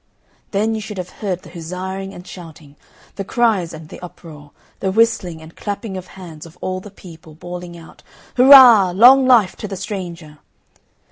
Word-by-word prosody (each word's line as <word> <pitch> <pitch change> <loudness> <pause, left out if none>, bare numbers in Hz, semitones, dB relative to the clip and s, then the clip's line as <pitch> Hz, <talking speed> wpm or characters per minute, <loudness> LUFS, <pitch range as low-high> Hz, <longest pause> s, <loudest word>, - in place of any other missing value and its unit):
Then 215 +2 -1
you 220 - -4
should 210 -1 -8
have 180 -1 -6
heard 185 -4 -3
the - - -14
huzzaing 185 +3 -6
and 180 -2 -12
shouting, 160 -6 -13 0.4
the 195 - -3
cries 205 -5 0
and 155 -1 -11
the - - -11
uproar, 160 -4 -13 0.3
the 190 - -2
whistling 190 -7 0
and 160 +1 -15
clapping 205 -1 -6
of 185 0 -8
hands 165 -4 -11
of 165 - -18
all 185 0 -4
the 205 - -12
people, 165 -5 -15
bawling 175 +1 -9
out, 165 -1 -16 0.3
"Hurra! 245 -8 +8
Long 255 +5 +6
life 225 -7 +4
to 210 - -6
the 195 -1 -7
stranger!" 175 -7 -8
185 Hz, 175 wpm, -18 LUFS, 170-210 Hz, 0.4 s, Hurra